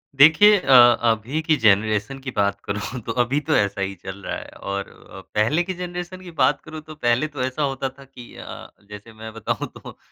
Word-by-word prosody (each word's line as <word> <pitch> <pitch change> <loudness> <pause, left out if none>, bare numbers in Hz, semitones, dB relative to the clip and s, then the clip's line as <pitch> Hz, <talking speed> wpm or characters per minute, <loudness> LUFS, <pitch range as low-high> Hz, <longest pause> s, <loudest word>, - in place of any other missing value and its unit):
देखिए 160 +9 +7
अ, 135 -6 +2 0.3
अभी 115 +6 0
की 160 0 +2
जनरेशन 105 +4 +2
की 130 0 -6
बात 100 -1 0
करूँ 105 +5 -4
तो - - -3
अभी 135 +5 -1
तो 155 - +4
ऐसा 100 -1 0
ही 95 0 -2
चल 95 +2 -9
रहा - - -3
है - - -10
और 100 0 -5
अ, - - -14
पहले 115 +11 +2
की 185 - -4
जनरेशन 180 +1 -6
की 180 -2 -10
बात 130 0 +3
करूँ 155 0 -9
तो 155 0 -12
पहले 125 +1 +1
तो 145 -3 -7
ऐसा 130 +3 -2
होता 135 -1 -2
था 135 +1 -16
कि 125 -3 -14
अ, - - -10 0.2
जैसे 105 +2 -11
मैं 110 0 -9
बताऊँ 115 -2 -3
तो - - -12
130 Hz, 215 wpm, -22 LUFS, 105-155 Hz, 0.3 s, देखिए